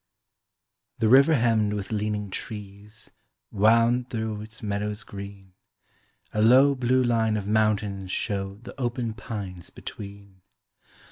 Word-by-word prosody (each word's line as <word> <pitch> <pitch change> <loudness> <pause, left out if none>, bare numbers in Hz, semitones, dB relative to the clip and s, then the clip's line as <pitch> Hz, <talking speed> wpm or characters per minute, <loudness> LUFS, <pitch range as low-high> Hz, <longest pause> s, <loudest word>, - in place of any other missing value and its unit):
The 110 - +2
river 140 +6 +7
hemmed 115 -4 +2
with 100 0 -4
leaning 105 -1 -2
trees 105 +1 -8 0.4
Wound 115 +4 +3
through 110 -2 -3
its 110 +1 -11
meadows 105 0 -2
green; 100 -1 -10 0.8
A 105 - +1
low, 130 +5 +6
blue 130 0 +2
line 115 -3 +2
of 100 -1 -4
mountains 105 -3 0
showed 100 +1 -3
The - - -9
open 120 -2 -2
pines 100 -6 -7
between. 100 -2 -10
105 Hz, 120 wpm, -26 LUFS, 100-115 Hz, 0.8 s, river